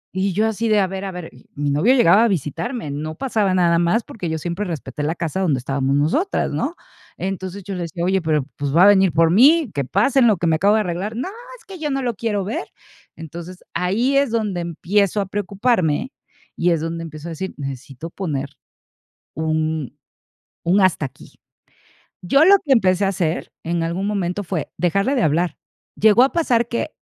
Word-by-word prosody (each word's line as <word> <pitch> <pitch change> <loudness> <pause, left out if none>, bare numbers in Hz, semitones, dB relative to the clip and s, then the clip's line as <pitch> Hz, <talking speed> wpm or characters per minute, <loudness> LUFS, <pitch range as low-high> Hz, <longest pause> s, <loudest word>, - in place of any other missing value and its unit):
Y 190 0 0
yo 215 +4 +2
así 220 +1 -1
de: 215 -1 +4
"A 195 - +3
ver, 190 +1 -5
a 190 - -4
ver", 180 -2 -7
y - - -19
mi 145 0 -1
novio 185 - +3
llegaba 215 -2 +5
a - - +4
visitarme, 170 - -3
no 155 +2 -5
pasaba 210 -5 0
nada 170 -2 +3
más, 175 +7 +2
porque 180 -7 -6
yo 160 - -2
siempre 175 +5 -3
respeté 150 -7 -5
la 155 +3 -1
casa 170 +1 -3
donde 165 -8 +1
estábamos 135 +1 -1
nosotras, 165 - 0
¿no? 325 +5 -2 0.4
Entonces, 190 +1 -5
yo 195 +1 -6
le 180 - -4
decía: 170 +1 -5
"Oye, 190 +1 +1
pero, 155 -4 +1
pues, 140 -1 -3
va 175 - +7
a - - +8
venir 190 -3 +5
por 165 0 +3
mí, 275 - +5
que 140 - -1
pase 220 - +2
en 245 - +6
lo 210 -5 +3
que 170 - -2
me 160 -1 +3
acabo 200 +6 +3
de 220 - +3
arreglar". 185 +4 -3
"No, 255 +11 -3 0.3
es 470 - -23
que 380 -3 -10
yo 300 - -2
no 270 -1 -1
lo 240 - -1
quiero 205 -2 -2
ver". 210 - -4 0.5
Entonces, 170 +3 -9
ahí 225 +10 +1
es 275 -2 +3
donde 210 -6 -1
empiezo 195 +5 0
a 200 - 0
preocuparme 200 - 0 0.4
y 175 - +1
es 165 -2 +2
donde 165 +1 -4
empiezo 155 +1 -8
a - - -6
decir: 190 +4 -5
"Necesito 140 +3 -7
poner 145 -7 -3 0.8
un 155 -2 -2 0.7
un 185 +4 +3
hasta 175 -5 +2
aquí". 130 - -12 0.9
Yo 275 - +4
lo 395 +3 +8
que 275 - +4
empecé 190 -4 +3
a - - +2
hacer, 170 -3 -2
en 170 0 -1
algún 175 +4 -2
momento, 200 -1 -2
fue, 170 -3 -3
dejarle 195 - +1
de 245 - +1
hablar. 165 +4 +1 0.4
Llegó 220 +3 +5
a 270 - +2
pasar 240 -9 +2
que, 240 +6 -3
185 Hz, 205 wpm, -21 LUFS, 160-215 Hz, 0.9 s, a